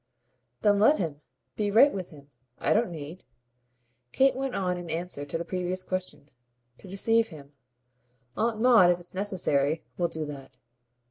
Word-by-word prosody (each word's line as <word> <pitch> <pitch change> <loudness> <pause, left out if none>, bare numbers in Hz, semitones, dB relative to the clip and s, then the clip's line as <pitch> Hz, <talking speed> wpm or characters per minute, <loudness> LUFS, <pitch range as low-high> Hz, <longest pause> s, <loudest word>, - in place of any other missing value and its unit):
"Then 205 -1 +4
let 285 +9 +5
him. 155 -5 -4 0.3
Be 210 -1 -1
right 235 +8 +6
with 185 -3 -5
him. 145 -3 -16 0.3
I - - +1
don't 230 +2 +2
need," 160 +1 -8 0.9
Kate 270 - +3
went 270 -1 -3
on 180 -2 0
in 175 -1 -7
answer 165 -3 -4
to 145 - -3
the 170 - -5
previous 185 0 -2
question, 185 -6 -5 0.5
"to - - -13
deceive 225 +4 +2
him. 145 -4 -13 0.8
Aunt 225 -1 0
Maud, 230 -7 +6
if 175 0 +2
it's 175 - -12
necessary, 165 -6 0 0.2
will 175 - +2
do 160 -2 -4
that. 140 -2 -10
180 Hz, 160 wpm, -27 LUFS, 160-210 Hz, 0.9 s, right